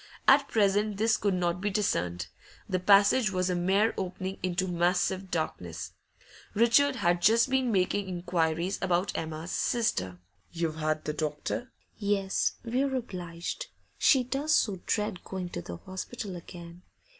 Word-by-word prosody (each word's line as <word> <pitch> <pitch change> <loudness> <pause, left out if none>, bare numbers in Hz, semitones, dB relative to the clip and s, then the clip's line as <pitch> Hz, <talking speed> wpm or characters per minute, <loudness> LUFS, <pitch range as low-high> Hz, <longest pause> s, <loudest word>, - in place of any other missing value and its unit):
At 275 +1 +6
present 205 -1 +2
this 220 +2 +3
could 200 -2 0
not 175 0 -1
be 205 - 0
discerned; 90 - -1 0.4
the 185 -2 0
passage 205 +5 +5
was 185 -1 0
a - - 0
mere 195 +5 +2
opening 190 0 -4
into 185 +1 -1
massive 180 +2 0
darkness. 90 - -4 0.6
Richard 240 +6 +4
had 175 -6 +1
just 230 +6 +4
been 260 -2 +2
making 195 0 +1
inquiries 175 0 -1
about 185 0 0
Emma's 160 +2 -4
sister. 95 - 0 0.3
'You've 165 -2 -2
had 155 -1 -1
the 150 - -1
doctor?' 155 +11 -3 0.3
'Yes, 200 -2 +1
we're 265 +3 0
obliged; 180 - -5 0.3
she 265 -3 +5
does 280 +5 +1
so 195 -5 +1
dread 210 -4 -1
going 185 -2 -5
to 85 - -5
the 85 0 -7
hospital 190 - -6
again. 170 0 -10
185 Hz, 145 wpm, -29 LUFS, 175-215 Hz, 0.6 s, At